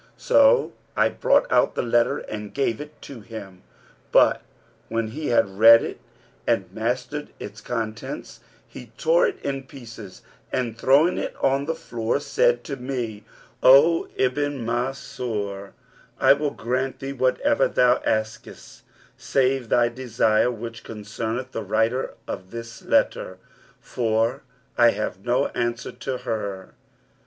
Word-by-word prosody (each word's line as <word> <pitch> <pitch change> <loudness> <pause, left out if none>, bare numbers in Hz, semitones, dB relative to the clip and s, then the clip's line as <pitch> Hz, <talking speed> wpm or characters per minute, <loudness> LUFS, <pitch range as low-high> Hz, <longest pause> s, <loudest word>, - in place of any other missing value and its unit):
so - - +4 0.2
I - - +4
brought - - +2
out - - +3
the - - -1
letter 120 0 +2
and 105 -1 -7
gave 135 -3 0
it 150 0 -11
to 135 -4 -9
him; 100 -4 -10 0.5
but, - - +5 0.5
when 115 -1 -1
he 150 +7 -5
had 100 -4 +1
read 115 +1 +9
it - - -6 0.5
and 95 -2 0
mastered 125 +7 -3
its 105 +1 -8
contents, 115 - -5 0.3
he - - -11
tore - - +3
it 410 - -5
in 135 -1 -3
pieces 115 -8 -11 0.3
and 120 -3 -2
throwing 140 +9 +3
it - - -4
on 135 +1 +1
the 165 +2 -2
floor, 115 -2 -2
said 120 -4 +1
to 140 - -5
me, 120 -5 -5 0.4
'O 145 +6 +6
Ibn 135 0 -1
Mansur, 115 -5 -3 0.5
I - - +7
will 145 +1 -1
grant 130 +1 -2
thee 135 +1 -5
whatever 140 - +2
thou 125 0 +3
askest 110 0 -4 0.4
save 130 -3 0
thy 120 -1 +4
desire 120 -2 +1
which 115 -1 -7
concerneth 115 +3 -5
the - - -4
writer 110 +5 0
of 95 - -6
this 115 +1 -8
letter, 95 - 0 0.4
for 115 +2 -1 0.4
I 120 0 +7
have 100 -4 -3
no 125 +3 +1
answer 120 0 -3
to 130 -2 -5
her.' 100 -5 -5
120 Hz, 135 wpm, -24 LUFS, 110-135 Hz, 0.5 s, read